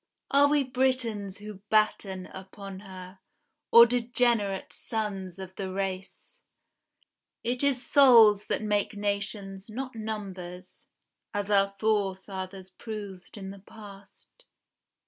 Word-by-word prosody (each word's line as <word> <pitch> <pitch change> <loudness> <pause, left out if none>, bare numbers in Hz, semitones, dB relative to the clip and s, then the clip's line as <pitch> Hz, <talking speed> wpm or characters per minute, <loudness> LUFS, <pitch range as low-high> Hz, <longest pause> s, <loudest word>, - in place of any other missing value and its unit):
Are 280 +1 +6
we 290 -1 +3
Britons 250 -6 -1
who 210 -1 -9
batten 200 -3 +1
upon 190 0 -9
her, 190 -1 -11 0.5
Or 235 0 +10
degenerate 235 -4 0
sons 195 -5 -4
of 190 -1 -9
the 190 -2 -4
race? 195 - -5 1.0
It 245 +3 -1
is 265 -3 +1
souls 230 -7 +7
that - - -1
make 210 0 0
nations, 200 -1 -3
not 255 +4 -5
numbers, 190 -5 -7 0.5
As 205 0 -2
our 195 -1 +3
forefathers 190 -2 -2
proved 205 -2 -8
in 195 -1 -6
the 200 - -11
past. 205 - -15
205 Hz, 110 wpm, -28 LUFS, 190-225 Hz, 1.0 s, Or